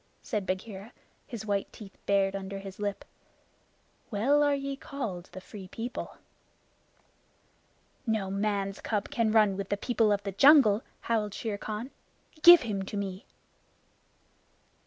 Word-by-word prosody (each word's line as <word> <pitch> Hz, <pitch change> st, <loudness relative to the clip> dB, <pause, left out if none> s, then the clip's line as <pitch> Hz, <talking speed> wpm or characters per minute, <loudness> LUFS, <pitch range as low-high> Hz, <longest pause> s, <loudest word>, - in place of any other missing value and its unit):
said 210 Hz, -5 st, -3 dB
Bagheera, 195 Hz, +2 st, -5 dB, 0.3 s
his 230 Hz, -6 st, -7 dB
white 200 Hz, -2 st, -1 dB
teeth 200 Hz, -3 st, -12 dB
bared 195 Hz, -1 st, +2 dB
under 195 Hz, 0 st, -5 dB
his 195 Hz, 0 st, -9 dB
lip. 205 Hz, -1 st, -3 dB, 1.0 s
"Well 255 Hz, +7 st, +2 dB
are 290 Hz, -1 st, +3 dB
ye 275 Hz, 0 st, -3 dB
called 230 Hz, -11 st, -5 dB
the -, -, -8 dB
Free 190 Hz, 0 st, -10 dB
People!" 230 Hz, +6 st, -6 dB, 1.9 s
"No 215 Hz, -4 st, 0 dB
man's 200 Hz, -1 st, -1 dB
cub 210 Hz, +1 st, -2 dB
can 230 Hz, -6 st, +1 dB
run 215 Hz, -3 st, +4 dB
with 200 Hz, -1 st, -4 dB
the 205 Hz, -, 0 dB
people 225 Hz, -1 st, +1 dB
of 205 Hz, 0 st, 0 dB
the 200 Hz, -, -3 dB
jungle," 225 Hz, -1 st, +6 dB, 0.2 s
howled 215 Hz, -3 st, -1 dB
Shere 210 Hz, -3 st, -4 dB
Khan. 215 Hz, +6 st, -5 dB, 0.5 s
"Give 345 Hz, 0 st, +10 dB
him 210 Hz, -5 st, -2 dB
to 195 Hz, +2 st, -5 dB
me!" 195 Hz, +3 st, -5 dB
210 Hz, 135 wpm, -29 LUFS, 195-230 Hz, 1.9 s, Give